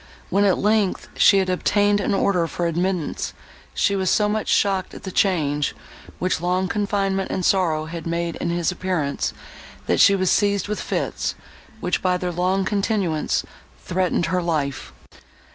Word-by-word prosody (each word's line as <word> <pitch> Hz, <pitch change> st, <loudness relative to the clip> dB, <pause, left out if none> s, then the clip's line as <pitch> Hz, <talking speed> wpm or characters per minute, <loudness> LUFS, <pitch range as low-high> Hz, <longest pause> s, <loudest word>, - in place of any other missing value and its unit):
When, 200 Hz, +2 st, +3 dB
at 195 Hz, -, +3 dB
length, 210 Hz, -2 st, +1 dB
she 200 Hz, -, +6 dB
had 190 Hz, -1 st, +2 dB
obtained 205 Hz, +3 st, +2 dB
an 200 Hz, -, 0 dB
order 180 Hz, -3 st, +1 dB
for 175 Hz, -, -3 dB
admittance, 175 Hz, 0 st, -1 dB, 0.4 s
she 200 Hz, -, +2 dB
was 190 Hz, -2 st, 0 dB
so 210 Hz, -, +3 dB
much 215 Hz, +1 st, -1 dB
shocked 195 Hz, -2 st, +1 dB
at -, -, -10 dB
the 190 Hz, -, -5 dB
change, 150 Hz, -7 st, +1 dB, 0.4 s
which 185 Hz, -2 st, -1 dB
long 180 Hz, +2 st, 0 dB
confinement 195 Hz, -1 st, -1 dB
and 185 Hz, -, -2 dB
sorrow 165 Hz, -5 st, +2 dB
had 165 Hz, +1 st, -6 dB
made 170 Hz, 0 st, -2 dB
in 170 Hz, -, -2 dB
his 170 Hz, +1 st, 0 dB
appearance, 175 Hz, -6 st, -2 dB, 0.5 s
that -, -, +1 dB
she 200 Hz, -, +7 dB
was 185 Hz, -2 st, +1 dB
seized 200 Hz, -2 st, +2 dB
with 210 Hz, 0 st, -3 dB
fits, -, -, -2 dB, 0.5 s
which, 180 Hz, 0 st, 0 dB
by 180 Hz, -1 st, +1 dB
their 180 Hz, 0 st, -3 dB
long 185 Hz, +2 st, 0 dB
continuance, 195 Hz, -6 st, 0 dB, 0.3 s
threatened 180 Hz, -1 st, 0 dB
her 180 Hz, +2 st, 0 dB
life. 150 Hz, -5 st, -2 dB
185 Hz, 160 wpm, -22 LUFS, 170-200 Hz, 0.5 s, she